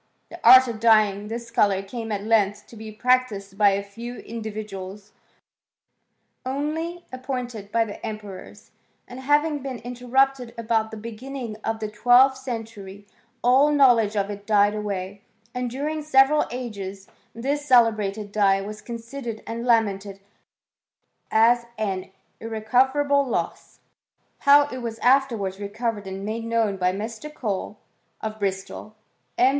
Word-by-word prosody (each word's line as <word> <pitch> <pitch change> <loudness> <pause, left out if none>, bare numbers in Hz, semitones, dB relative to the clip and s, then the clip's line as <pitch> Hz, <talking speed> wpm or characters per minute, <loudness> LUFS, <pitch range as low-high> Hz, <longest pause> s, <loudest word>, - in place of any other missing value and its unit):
The - - -9
art 260 0 +9
of 230 -3 -5
dyeing 215 -3 +3
this 230 +1 -6
colour 200 -4 +2
came 225 +2 -6
at 200 -1 -2
length 210 -2 +1
to - - -13
be 220 0 -8
practised 215 -4 0
by 205 0 +5
a 200 0 -1
few 230 +5 -8
in 230 0 -7
dividuals 210 -2 -7 1.3
only, 310 +6 -3
appointed 250 -5 -5
by 230 -1 +2
the 205 - -9
emperors, 210 -4 -8 0.4
and 250 +1 -9
having 290 +3 +2
been 265 -2 -5
interrupted 250 +1 0
about 225 -1 0
the 220 - -8
beginning 230 +2 -7
of 225 0 -2
the 215 - -3
twelfth 245 +5 +4
century 220 -6 -7 0.4
all 260 +4 +5
knowledge 240 -7 +4
of 200 0 0
it 205 0 -9
died 205 -1 +4
away, 200 -2 -4 0.3
and 250 0 -2
during 300 +5 -3
several 295 0 +4
ages 200 -6 -6 0.3
this 285 +5 -2
celebrated 215 -5 +3
dye 200 -2 +3
was 210 +2 -7
considered 235 0 -7
and 235 +2 -5
lamented 200 -4 +1 1.1
as 235 +2 +4
an 190 -4 -3 0.3
irrecoverable 265 +6 +2
loss.| 260 - -4 0.6
How 285 0 +6
it 255 - -6
was 230 -2 -5
afterwards 230 -7 +2
recovered 205 0 -3
and 190 +1 -6
made 225 +2 -4
known 225 -3 0
by 180 -1 +1
Mr. 225 +9 -6
Cole, 210 -6 -4 0.4
of 220 0 -5
Bristol, 195 +2 -4 0.4
M. 255 - +5
225 Hz, 140 wpm, -24 LUFS, 205-255 Hz, 1.3 s, art